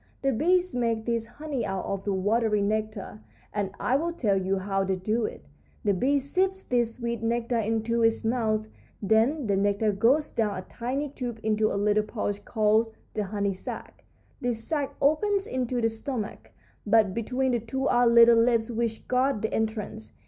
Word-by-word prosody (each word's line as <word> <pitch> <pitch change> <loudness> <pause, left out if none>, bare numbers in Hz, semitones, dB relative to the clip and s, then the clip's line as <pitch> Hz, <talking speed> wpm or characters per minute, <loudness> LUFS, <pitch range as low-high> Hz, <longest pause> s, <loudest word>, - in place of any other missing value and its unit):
The 275 - +3
bees 360 +8 +2
make 230 -2 0
this 230 -1 -1
honey 290 -4 -4
out 195 -2 -3
of 195 -1 -4
the 205 - 0
watery 210 +2 +1
nectar, 210 - -3 0.3
and 205 -2 -1
I 255 - +2
will 335 +4 -1
tell 220 -12 +1
you 190 0 0
how 195 0 -1
they 190 0 0
do 215 +5 -1
it. 70 - -10 0.4
The 205 - +2
bee 265 +10 +2
sips 375 +8 0
this 240 -2 0
sweet 235 -2 -3
nectar 235 +1 0
into 225 +1 0
its 225 0 +2
mouth, 220 -2 +1 0.3
then 225 +8 +2
the 200 -2 +1
nectar 205 +2 +2
goes 235 +9 +2
down 210 -4 0
a 185 - -5
tiny 255 +8 -3
tube 245 -4 -5
into 215 0 +2
a - - -1
little 210 +1 +2
pouch 205 -2 -3
called 220 0 +2 0.2
the 210 - -1
honey 200 0 -1
sac. 185 - -8 0.4
This 240 -2 -2
sac 290 0 -2
opens 390 +7 +2
into 255 - -2
the 225 - +3
stomach, 225 -1 -5 0.3
but 210 -2 +3
between 250 +4 -1
the 240 - +1
two 265 +5 -2
are 245 0 +4
little 235 0 +7
lips 230 0 +2
which 230 -1 -2
guard 255 -3 +1
the 220 - -1
entrance. 220 0 -3
225 Hz, 180 wpm, -27 LUFS, 210-250 Hz, 0.4 s, little